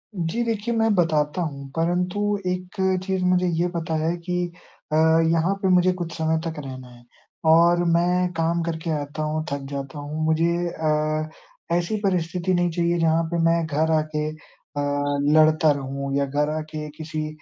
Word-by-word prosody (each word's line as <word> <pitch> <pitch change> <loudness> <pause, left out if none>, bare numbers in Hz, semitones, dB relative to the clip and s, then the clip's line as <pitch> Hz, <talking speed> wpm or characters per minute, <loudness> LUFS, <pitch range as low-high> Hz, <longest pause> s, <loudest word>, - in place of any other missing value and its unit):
जी। 175 +6 -1
देखिए, 230 0 -1
मैं 225 -1 +3
बताता 155 -2 +1
हूँ, 140 -4 -5
परंतु 180 +3 0 0.3
एक 180 0 -3 0.3
चीज़ 190 -1 -1
मुझे 180 0 +3
ये 175 - +2
पता 165 -1 -2
है 165 +2 +1
कि 180 0 -1 0.6
अ, - - +3
यहाँ 165 +2 +3
पे 190 - +1
मुझे 180 0 +4
कुछ 170 -1 -4
समय 160 0 +1
तक 165 -1 -3
रहना 130 -1 -8
है। 120 -1 -16 0.5
और 170 +1 +5
मैं 180 +1 +2
काम 165 +1 0
करके 165 0 -3
आता 145 +2 -4
हूँ, 155 +1 -1
थक 140 0 -2
जाता 140 0 -5
हूँ। 150 +2 -4
मुझे 160 +2 +2 0.2
अ, 155 -1 -1 0.5
ऐसी 175 +5 0
परिस्थिति 180 -1 0
नहीं 175 0 +2
चाहिए 170 +1 +1
जहाँ 165 0 +3
पे 170 - 0
मैं 165 0 +3
घर 155 +1 0
आके 155 -1 0
अ, - - -10 1.0
लड़ता 155 0 +5
रहूँ, 140 0 -3
या 140 - +2
घर 145 +2 0
आके 155 0 -5
किसी 155 -1 -4
160 Hz, 170 wpm, -23 LUFS, 155-175 Hz, 1.0 s, और